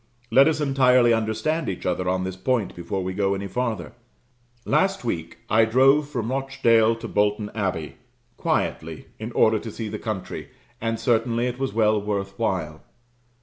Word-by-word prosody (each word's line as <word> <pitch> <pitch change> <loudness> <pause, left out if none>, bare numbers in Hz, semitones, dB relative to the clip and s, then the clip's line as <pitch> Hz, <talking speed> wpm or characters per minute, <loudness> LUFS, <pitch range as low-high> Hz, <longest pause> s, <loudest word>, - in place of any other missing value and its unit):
Let 135 +3 +7
us 155 -1 +1
entirely 130 -4 +4
understand 115 +9 -1
each 90 - -5
other 90 -1 0
on 95 0 0
this 95 0 -4
point 110 +2 -1
before 90 +2 -3
we 95 +1 -3
go 100 0 +1
any 100 +1 -5
farther. 110 -3 -3 0.7
Last 190 +1 +1
week, 85 -7 -3
I 110 +1 +4
drove 135 +6 +4
from 120 -4 -3
Rochdale 115 -4 +2
to 115 0 -7
Bolton 105 0 0
Abbey; 90 -8 -3 0.4
quietly, - - -2
in 110 +2 -5
order 110 0 +4
to 115 - -7
see 110 0 -5
the 105 0 -5
country, 110 -5 -5 0.3
and 115 0 -1
certainly 120 -1 +1
it 125 0 -3
was 135 -6 -2
well 110 -2 +3
worth 100 -1 -3
while. 80 -8 -2
110 Hz, 165 wpm, -24 LUFS, 100-125 Hz, 0.7 s, Let